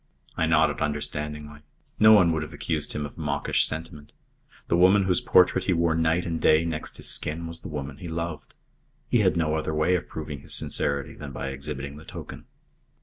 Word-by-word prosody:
I 80 - +1
nodded 80 -2 +2
understandingly. 75 0 -3 0.4
No 110 0 +8
one 90 -6 +6
would 80 -1 -1
have 75 - -7
accused 75 -3 -2
him 75 - -3
of 70 - -10
mawkish 75 -2 +1
sentiment. 75 -2 -8 0.5
The - - +2
woman 95 +3 +5
whose 95 -2 +1
portrait 90 +1 +4
he 95 - +2
wore 85 -1 +2
night 80 +2 +1
and 80 -2 -3
day 80 +2 +4
next 80 -2 -3
his - - -2
skin 80 +3 0
was 85 0 -6
the - - -9
woman 75 -1 -6
he 90 - -8
loved. 80 -4 -5 0.5
He - - +3
had - - +2
no 80 -2 +1
other 80 0 -2
way 80 +4 +2
of 90 -1 -1
proving 75 -2 -6
his - - -2
sincerity 70 -2 0
than 75 -2 -9
by 65 +1 -5
exhibiting 70 +1 -6
the 80 - -13
token. - - -9
80 Hz, 200 wpm, -26 LUFS, 75-85 Hz, 0.5 s, No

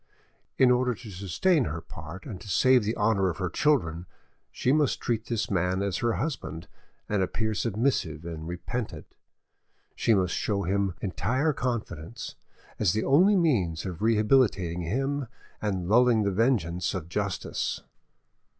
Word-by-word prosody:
In 130 -1 +6
order 125 0 +2
to 110 0 -10
sustain 100 - +1
her 80 +1 -3
part 85 +2 -10
and 110 -10 -7
to 105 - -10
save 130 +5 +4
the 110 +2 -2
honour 105 -3 +2
of 80 - -4
her 90 -1 -2
children, 90 - +1 0.4
she 130 - 0
must 150 -1 +2
treat 115 -1 -2
this 115 -3 -2
man 90 +1 +1
as 100 -2 -1
her 120 -1 +1
husband 120 - -4 0.4
and 105 -2 0
appear 110 +4 -1
submissive 105 - -1
and 80 -2 -6
repentant; 105 +7 -5 0.8
she 115 - +3
must 90 -2 +1
show 100 -2 -1
him 95 0 0
entire 130 - 0
confidence, 115 - -4 0.5
as 95 -5 +3
the 110 - 0
only 180 +10 +5
means 100 - +1
of 90 -3 -5
rehabilitating 105 -6 +2
him 135 - -1 0.3
and 95 -4 -2
lulling 115 +1 +4
the 100 - +1
vigilance 95 -6 +1
of 85 -4 -4
justice. 100 +1 -2
105 Hz, 150 wpm, -27 LUFS, 90-125 Hz, 0.8 s, In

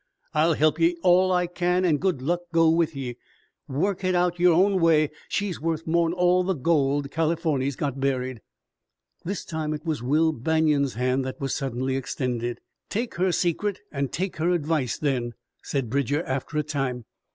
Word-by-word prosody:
I'll 160 +2 +3
help 155 +2 +2
ye 170 +1 +3
all 185 +1 +5
I 180 -1 +2
can, 180 +1 0
an' 160 -4 +3
good 170 -6 -1
luck 175 +5 +1
go 165 -1 +4
with 165 -2 +1
ye. 125 -3 -5 0.5
Work 175 +8 -1
hit 185 -1 +1
out 175 0 +1
yore 175 -1 +5
own 190 +2 +3
way. 155 -2 +4 0.2
She's 200 -6 -2
worth 165 0 -2
more'n 165 0 +2
all 180 +1 +3
the 190 +1 0
gold 140 -1 +1
Californy's 155 -4 0
got 140 -1 -3
buried!" 130 -3 -1 0.8
This 195 +3 -4
time 155 -2 -3
it 150 - -9
was 155 -5 -2
Will 155 +6 +2
Banion's 150 -1 +1
hand 130 +2 0
that 130 - -5
was 135 -2 -2
suddenly 130 -1 -2
extended. 120 -2 -2 0.3
"Take 230 +3 -2
her 185 +1 +2
secret 180 +4 0
an' 140 -1 -1
take 185 +6 -3
her 165 +2 +1
advice 155 -6 0
then," 125 -5 -1 0.3
said 135 -4 -2
Bridger 140 +5 0
after 135 +2 -3
a 150 - +2
time. 135 -5 -3
155 Hz, 175 wpm, -25 LUFS, 135-175 Hz, 0.8 s, all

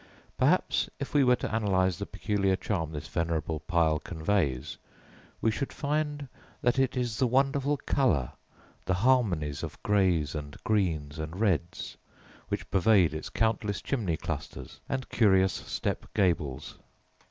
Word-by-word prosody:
Perhaps 150 +8 +2
if 140 - -5
we 145 -2 +5
were 125 -1 +5
to 110 - -3
analyse 95 -5 +1
the - - -4
peculiar 100 -2 0
charm 85 -5 -2
this 75 -2 -6
venerable 80 -1 -1
pile 80 -1 +1
conveys, 80 -5 -1 0.6
we 110 - +3
should 135 +5 -3
find 150 -1 -2 0.4
that 120 +2 +2
it 135 -1 +1
is 120 -3 -1
the 130 - +3
wonderful 135 +3 +2
colour, 90 - +1 0.5
the 95 - +1
harmonies 90 - +2
of - - -6
greys 90 -8 +2
and 75 -2 -6
greens 80 -8 0
and 80 +4 -5
reds 90 -6 -1 0.5
which - - -3
pervade 95 -4 +4
its 80 - -5
countless 110 -2 0
chimney 100 - -1
clusters - - -6
and 130 -1 -2
curious 95 -5 +4
step - - -3
gables. 75 -8 0
95 Hz, 140 wpm, -29 LUFS, 80-125 Hz, 0.6 s, we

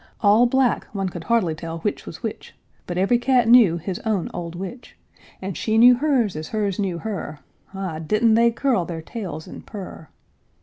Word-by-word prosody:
All 215 +4 +5
black, 260 -1 +1
one 195 -2 -2
could 175 -2 -8
hardly 225 -9 +2
tell 165 +1 -6
which 210 - -3
was - - -9
which, - - -6 0.3
But 175 - -4
every 195 +6 +3
cat 245 -2 +2
knew 225 -8 +6
his 180 +2 -5
own 215 -6 -2
old 170 -1 -6
witch; 195 +8 -8 0.5
And 190 -2 -4
she 220 0 0
knew 245 +2 +8
hers 245 - +1
as 155 0 -5
hers 205 -3 -2
knew 190 -4 -1
her, 170 -6 -5 0.3
Ah, 185 -5 -4
didn't 215 +8 +2
they 235 +1 +5
curl 235 -4 0
their 165 -1 -6
tails 175 -7 -6
and - - -10
purr! 190 -6 -9
200 Hz, 185 wpm, -22 LUFS, 175-235 Hz, 0.5 s, knew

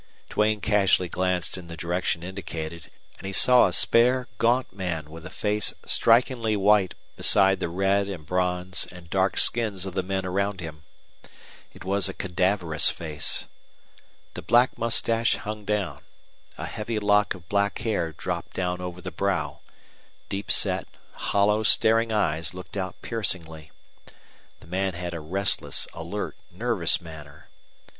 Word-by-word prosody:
Duane 105 0 +2
casually 95 -3 +3
glanced 90 0 -1
in 85 - -11
the 85 0 -8
direction 85 0 -1
indicated, 85 -3 -6 0.3
and 95 - -7
he - - -3
saw 125 +5 +6
a - - -2
spare, 125 +2 +3
gaunt 120 0 +2
man 85 -6 -4
with 80 0 -9
a - - -10
face 105 +4 -1
strikingly 115 -1 +3
white 100 -1 +3 0.2
beside 95 -2 +3
the 90 - -2
red 95 +3 +1
and 90 -6 -7
bronze 90 +1 -1
and 85 -2 -13
dark 95 0 +1
skins 105 -6 +3
of 95 - -5
the 95 - 0
men 95 +1 -3
around 100 +1 -1
him. 80 -3 -8 0.9
It - - -13
was 100 0 +1
a 95 - -6
cadaverous 90 -4 +1
face. 75 -3 -2 0.9
The - - -7
black 120 +8 +3
mustache 115 0 +1
hung 105 0 -6
down; 105 -2 -2 0.6
a - - -5
heavy 110 +1 -4
lock 105 -1 +2
of 90 -2 -15
black 100 +1 +1
hair 100 -8 -1
dropped 85 +2 -5
down 90 -1 -2
over 90 0 -6
the 90 0 -6
brow; 75 -8 -1 0.7
deep 100 +1 -4
set, - - +1 0.3
hollow, 105 +2 +1
staring 110 +1 +5
eyes 85 -5 0
looked 90 +2 -10
out 95 -2 -4
piercingly. 80 -8 -3 0.9
The - - -16
man 95 +1 -1
had 90 0 -5
a 85 - -4
restless, 95 +6 0
alert, - - -5 0.2
nervous 100 -3 +2
manner. 75 -3 -12
95 Hz, 150 wpm, -25 LUFS, 85-105 Hz, 0.9 s, saw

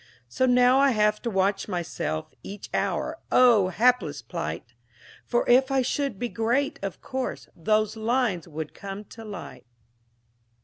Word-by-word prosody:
So 260 - +1
now 250 +1 +5
I 280 0 +5
have 210 -1 +2
to 235 - -2
watch 195 -1 0
myself 170 - -3
Each 200 +1 -9
hour. - - -1
Oh, 235 -7 +6
hapless 185 - +1
plight! 85 +1 -5 0.5
For 240 - +1
if 260 +2 +5
I 270 -1 +2
should 270 -2 -1
be 245 - -2
great, 240 +5 0
of 195 -2 -5
course, 260 -1 -4
Those 215 +5 +1
lines 220 -5 0
would 155 -1 -6
come 200 +1 -7
to 225 +2 -12
light. 205 - -9
215 Hz, 145 wpm, -26 LUFS, 190-250 Hz, 0.5 s, Oh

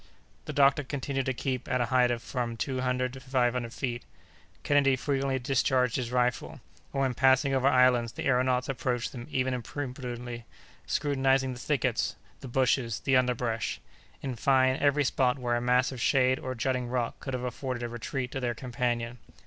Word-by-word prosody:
The - - -4
doctor 140 +1 +4
continued 135 0 -3
to - - +2
keep 130 -1 -3
at 130 -1 +1
a 120 - +2
height 125 -1 +5
of 120 -1 -2
from 120 -3 -3
two 130 +3 -2
hundred 125 0 0
to 135 - -8
five 130 -2 +1
hundred 120 -2 -3
feet. 120 -2 -3 0.6
Kennedy 140 -2 +4
frequently 135 0 -1
discharged 125 -1 +1
his 125 -3 -2
rifle; 125 0 0 0.4
and, 135 - -1
when 130 -2 +1
passing 135 +2 +3
over 135 0 +2
islands, 125 -3 +4
the - - -5
aëronauts 125 -1 +2
approached 125 -2 -2
them 120 -2 -8
even 130 0 0
imprudently, 125 -2 -5 0.4
scrutinizing 135 -2 +1
the 125 - -9
thickets, 130 -3 0 0.2
the - - -8
bushes, 125 -2 +1
the 135 - +2
underbrush—in 125 +1 -2
fine, 130 +1 +3
every 145 +1 +3
spot 130 -1 +1
where 120 -2 -1
a 120 - 0
mass 125 +2 +2
of 130 -3 -6
shade 130 -1 +3
or 130 0 -4
jutting 125 +1 -1
rock 120 -1 -2
could 135 -2 -4
have 125 - -4
afforded 125 0 -4
a - - -1
retreat 125 +2 -4
to 135 - -3
their 120 -2 -1
companion. 120 -1 -2
125 Hz, 180 wpm, -29 LUFS, 120-135 Hz, 0.6 s, height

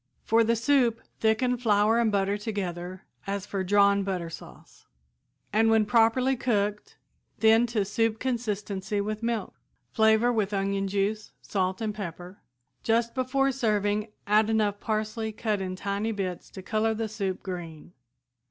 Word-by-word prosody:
For 230 +1 +3
the 230 +1 +2
soup, 235 -1 +2 0.2
thicken 235 +3 +2
flour 220 -1 +3
and 230 -2 +2
butter 200 0 +1
together 185 -4 -5 0.2
as 200 0 -3
for 195 -2 -3
drawn 200 +1 +4
butter 185 -4 -3
sauce, - - -13 0.7
and 225 +1 +4
when 220 -1 +4
properly 230 +5 +3
cooked 210 -4 -1 0.4
thin 225 +2 +5
to 220 -4 0
soup 225 +2 0
consistency 210 -5 -2
with 215 +2 -3
milk. 230 -1 -2 0.4
Flavor 220 +2 +4
with 210 -3 0
onion 195 0 0
juice, 205 +2 -2
salt 190 0 -1
and 215 -1 -1
pepper. 180 -2 -7 0.4
Just 230 +1 +1
before 270 +1 +1
serving 210 -4 0 0.2
add 215 +1 +3
enough 210 -2 +1
parsley 220 +1 -2
cut 215 -2 -2
in 185 -1 -3
tiny 200 +3 -2
bits 190 -4 -4
to 190 - -10
color 220 +2 0
the 225 0 -2
soup 195 -3 -4
green. 175 -3 -7
210 Hz, 145 wpm, -27 LUFS, 200-225 Hz, 0.7 s, thin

